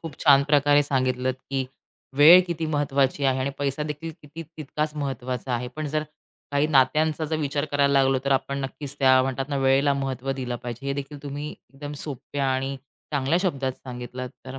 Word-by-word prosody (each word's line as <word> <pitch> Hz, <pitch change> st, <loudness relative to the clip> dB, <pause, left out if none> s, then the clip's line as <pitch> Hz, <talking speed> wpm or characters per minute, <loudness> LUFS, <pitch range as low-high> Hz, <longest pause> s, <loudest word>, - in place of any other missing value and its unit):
खूप 160 Hz, -4 st, -7 dB
छान 140 Hz, -2 st, +6 dB
प्रकारे 145 Hz, 0 st, +4 dB
सांगितलत 130 Hz, -2 st, 0 dB, 0.2 s
की 135 Hz, -1 st, -1 dB, 0.5 s
वेळ 165 Hz, +5 st, +9 dB
किती 165 Hz, -2 st, -2 dB
महत्वाची 140 Hz, -2 st, 0 dB
आहे 130 Hz, -1 st, +2 dB
आणि 135 Hz, -, -1 dB
पैसादेखील 150 Hz, +3 st, -3 dB
किती 150 Hz, +3 st, -9 dB
तितकाच 155 Hz, -1 st, -4 dB
महत्त्वाचा 130 Hz, -3 st, -3 dB
आहे. 125 Hz, +1 st, -3 dB
पण 150 Hz, +4 st, -5 dB
जर 155 Hz, +1 st, -1 dB, 0.5 s
काही 145 Hz, +1 st, +2 dB
नात्यांचा 155 Hz, +3 st, +2 dB
जर 160 Hz, +1 st, -1 dB
विचार 145 Hz, 0 st, -1 dB
करायला 140 Hz, 0 st, +3 dB
लागलो 135 Hz, 0 st, +2 dB
तर 140 Hz, -, +2 dB
आपण 140 Hz, +1 st, 0 dB
नक्कीच 140 Hz, +1 st, -6 dB
त्या 130 Hz, -1 st, +6 dB
म्हणतात 135 Hz, +1 st, -2 dB
ना, 140 Hz, -, -1 dB
वेळेला 135 Hz, +1 st, +3 dB
महत्त्व 135 Hz, -1 st, -3 dB
दिलं 125 Hz, -2 st, -4 dB
पाहिजे. 120 Hz, +3 st, -6 dB
हे 140 Hz, -, 0 dB
देखील 140 Hz, 0 st, -7 dB
तुम्ही 145 Hz, +1 st, -5 dB
एकदम 145 Hz, +2 st, -10 dB
सोप्या 140 Hz, -1 st, -4 dB
आणि 135 Hz, +1 st, -2 dB, 0.4 s
चांगल्या 145 Hz, +4 st, +1 dB
शब्दात 135 Hz, -8 st, -1 dB
सांगितलत. 125 Hz, 0 st, -7 dB, 0.2 s
तर 135 Hz, +1 st, -7 dB
140 Hz, 175 wpm, -25 LUFS, 130-150 Hz, 0.5 s, वेळ